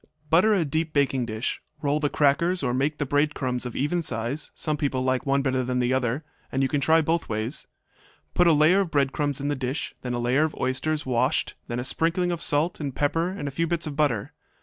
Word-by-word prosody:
Butter 180 +7 +5
a 175 -5 +1
deep 155 +2 -2
baking 135 -4 +1
dish. 110 +1 -3 0.2
Roll 145 +1 +1
the 150 -1 0
crackers, 160 +5 +2
or 125 -2 0
make 145 +4 0
the 145 - -1
bread 145 +3 +1
crumbs 125 -2 -2
of 120 - -8
even 150 +6 0
size; 130 +1 -2
some 155 -2 0
people 135 -3 -1
like 130 +1 0
one 135 0 +2
better 130 -1 +1
than 125 0 -1
the 125 0 +1
other, 130 +3 -1 0.3
and 135 +1 +1
you - - +3
can 145 -2 0
try 160 +3 +4
both 165 +2 -1
ways. 110 +5 -3 0.7
Put 175 - +4
a - - +7
layer 155 +5 +5
of 145 -8 +1
crumbs 145 -2 -1
in 140 +1 -2
the 145 - 0
dish, 130 +2 -3
then 125 -1 -3
a - - -2
layer 125 +5 +2
of 155 - -1
oysters, 150 +4 -1
washed, 130 +3 +1
then 120 - -3
a 125 - -2
sprinkling 170 +6 0
of 170 -1 -3
salt 155 +5 +1
and 140 -4 -4
pepper 165 +4 +1
and 185 -6 -5
a - - -3
few 165 +5 -1
bits 170 0 -1
of 150 -2 -5
butter. 140 -9 0
145 Hz, 235 wpm, -25 LUFS, 130-160 Hz, 0.7 s, a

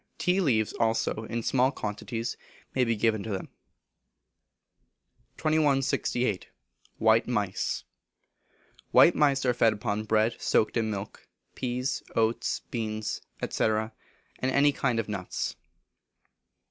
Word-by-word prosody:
Tea 180 +2 +2
leaves 110 - +2
also, 115 -1 0
in 115 +1 -3
small 130 +2 +3
quantities, 115 0 -4 0.4
may 130 - +2
be 115 -1 +1
given 110 0 +1
to 110 - -6
them. 95 -3 -4 1.9
2168. 135 - +1 0.5
White 110 +1 +4
Mice. 105 -6 -1 1.1
White - - +7
Mice 140 -3 +2
are 125 - +3
fed 115 -2 +3
upon 105 0 -2
bread 110 +1 +1
soaked 110 - +2
in 115 -2 +1
milk, 100 -1 -6 0.3
peas, 125 +1 -2
oats, 115 0 +1
beans, 110 -2 -3 0.3
&c., - - -1
and 110 0 +1 0.5
any 140 +3 +4
kind 125 -4 0
of 115 - -2
nuts. 100 -4 -3
115 Hz, 115 wpm, -28 LUFS, 110-130 Hz, 1.9 s, White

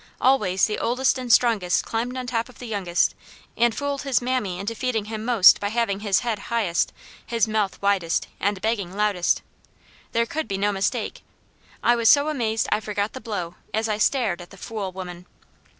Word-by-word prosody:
Always 210 -8 +3
the 210 - -3
oldest 255 +2 +1
and 250 -2 -3
strongest 220 -8 +3
climbed 240 +3 -2
on 255 - -4
top 235 -1 -2
of 250 - -16
the 245 - -9
youngest 195 -6 +1 0.4
and 235 -1 +2
fooled 285 -1 -2
his 275 -3 +1
mammy 245 -7 -1
into 200 +4 -3
feeding 230 -3 -1
him 215 0 -5
most 225 -5 +6
by 205 - -1
having 220 -3 0
his 205 -2 +1
head 230 -4 -2
highest, 210 -8 +1 0.3
his 230 -2 0
mouth 215 -3 -1
widest, 190 -5 +1
and 200 0 0
begging 200 -5 -1
loudest. 205 -4 +1 0.7
There 230 0 +2
could 310 +6 -3
be 195 - -2
no 205 +1 +1
mistake. 195 -1 -2 0.6
I 240 - +5
was 230 -1 +3
so 285 +1 +5
amazed 225 -7 0
I 210 - +3
forgot 210 -1 -3
the 260 - -7
blow, 180 -7 -4 0.2
as 220 +1 0
I 215 -1 -1
stared 215 -8 +1
at 175 - -11
the 195 - -14
fool 200 -1 -5
woman. 180 -1 -8
220 Hz, 190 wpm, -24 LUFS, 195-240 Hz, 0.7 s, most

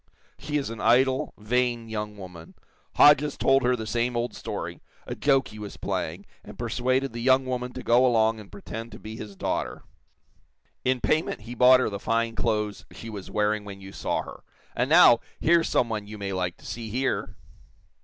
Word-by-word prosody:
She 150 0 -2
is 140 -5 -3
an 115 - -7
idle, 130 +2 +3
vain 120 +1 0
young 105 -1 -5
woman. 90 -4 -11 0.4
Hodges 145 0 +5
told 135 0 +3
her 125 0 +2
the 110 -2 -5
same 120 +2 -1
old 120 +1 -2
story - - -6 0.2
a - - -5
joke 135 -2 +2
he 105 - -11
was 105 -1 -8
playing, - - -3 0.2
and - - -12
persuaded 130 +1 -1
the 120 - -5
young 130 +1 +4
woman 125 -1 -3
to 130 - -7
go 120 +2 +4
along 110 -3 +3
and 105 - -13
pretend 115 +3 -8
to 110 - -10
be 110 -1 -8
his 105 -3 -8
daughter. - - -3 1.0
In 130 -1 +1
payment 155 -7 0
he 115 +3 -8
bought 125 +1 +6
her - - +1
the 100 - -4
fine 115 +2 0
clothes 105 -2 -1
she 115 - -9
was 100 -3 -8
wearing 105 0 0
when 100 -1 -9
you 95 0 -10
saw - - -2
her. - - -11 0.3
And 125 +3 0
now, 160 -7 +7 0.2
here's 170 0 +3
some 120 - +2
one 105 -2 -4
you 105 0 -8
may 100 -1 -4
like 90 -1 -2
to - - -18
see 115 -1 -6
here!" 130 +5 -2
115 Hz, 195 wpm, -26 LUFS, 105-130 Hz, 1.0 s, now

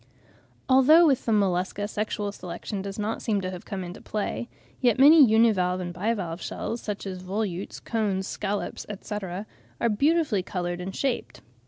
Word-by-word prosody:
Although 275 +6 +7
with 275 -5 +2
the - - +2
Mollusca 200 0 +1
sexual 210 -1 -2
selection 185 +2 -6
does 195 0 -6
not 215 +1 -2
seem 210 -3 0
to 185 0 -3
have 180 -1 -8
come 195 -2 -4
into 175 0 -8
play; 215 +3 -3 0.3
yet 240 -4 +3
many 295 +3 +8
univalve 215 -6 +3
and 175 -1 -4
bivalve 185 -3 -2
shells, 230 - -4
such 205 -1 -5
as 185 -2 -5
volutes, 190 0 -3
cones, 205 -4 -1
scallops, 205 +1 -3
etc., 200 -1 -5 0.3
are 235 - +2
beautifully 280 - +2
coloured 175 -1 -3
and 190 +2 -5
shaped. 265 -3 -2
205 Hz, 160 wpm, -26 LUFS, 185-230 Hz, 0.3 s, many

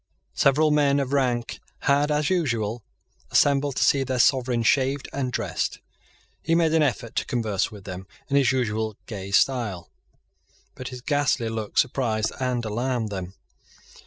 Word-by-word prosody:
Several 150 +3 +3
men 145 -1 +3
of 135 0 -2
rank 125 -4 0 0.2
had, 145 +1 +2
as 150 +2 +1
usual, 120 - -1 0.5
assembled 140 -1 +2
to - - +1
see 135 -1 +3
their 130 -1 -2
sovereign 125 -2 +2
shaved 135 +3 +1
and 135 -2 -2
dressed. - - -2 0.6
He 165 - +1
made 165 -2 +2
an 160 - +4
effort 120 -4 -1
to - - +1
converse 110 -7 -1
with 105 -3 -12
them 95 0 -8 0.2
in 140 - -1
his 135 -3 +4
usual 110 -4 -1
gay 100 -3 -7
style; 105 -4 +1 0.8
but 130 - -8
his 125 -2 -8
ghastly 145 -4 0
look 110 -2 -5
surprised 120 -5 +1
and 125 -2 -1
alarmed 120 +1 -1
them. 95 -1 -6
125 Hz, 155 wpm, -24 LUFS, 110-140 Hz, 0.8 s, an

